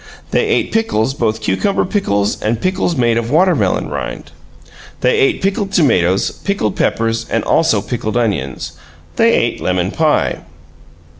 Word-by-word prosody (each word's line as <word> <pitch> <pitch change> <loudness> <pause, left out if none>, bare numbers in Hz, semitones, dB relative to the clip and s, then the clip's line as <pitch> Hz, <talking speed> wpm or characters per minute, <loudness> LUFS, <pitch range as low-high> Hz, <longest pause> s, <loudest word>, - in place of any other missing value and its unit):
They - - +1
ate - - 0
pickles, 135 - 0
both 110 -5 -1
cucumber 195 - 0
pickles 105 - -1
and 110 +1 -1
pickles 185 0 0
made 120 -2 +2
of 115 0 -4
watermelon 175 +6 +2
rind; - - -6 0.7
they 465 -3 +2
ate 400 - +1
pickled 195 0 -1
tomatoes, 95 - +2
pickled 195 - -1
peppers, 115 0 0 0.2
also 110 -12 +2
pickled 115 -2 -3
onions. 80 - -2 0.5
They - - +4
ate - - 0
lemon 90 +1 0
pie. 155 +1 +1
120 Hz, 135 wpm, -16 LUFS, -, 0.7 s, They